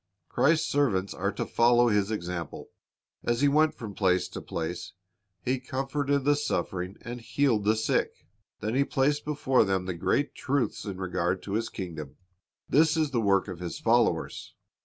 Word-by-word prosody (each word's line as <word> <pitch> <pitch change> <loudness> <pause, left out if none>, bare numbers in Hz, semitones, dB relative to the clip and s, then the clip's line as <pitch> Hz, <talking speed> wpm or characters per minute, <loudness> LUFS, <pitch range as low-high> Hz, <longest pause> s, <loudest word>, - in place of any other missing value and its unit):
Christ's 160 +2 +3
servants 100 -10 +1
are 100 +2 -1
to - - -3
follow 120 0 +4
His 105 -1 +2
example. 85 -6 -5 0.5
As 120 +1 0
He 145 - +5
went 155 +2 +3
from 110 -4 -7
place 90 -2 +2
to - - -7
place. 85 +1 -5 0.5
He 130 +1 0
comforted 135 +2 -1
the 145 0 +4
suffering 95 -8 -2
and 120 +1 -6
healed 115 -4 +1
the 110 +1 +4
sick. 110 - +1 0.5
Then 110 +2 -2
He 135 +2 +3
placed 140 +2 0
before 140 -3 +2
them 95 -2 0
the 95 - -2
great 140 - 0
truths 140 -3 -1
in 100 -3 -5
regard 90 -1 -1
to 100 - -5
His 115 +2 -1
kingdom. 80 -6 -7 0.5
This 160 +2 +4
is 155 -3 +1
the 120 -3 +1
work 100 -2 +2
of 90 -3 -6
His 90 -2 -5
followers. - - +1
110 Hz, 170 wpm, -28 LUFS, 95-140 Hz, 0.5 s, He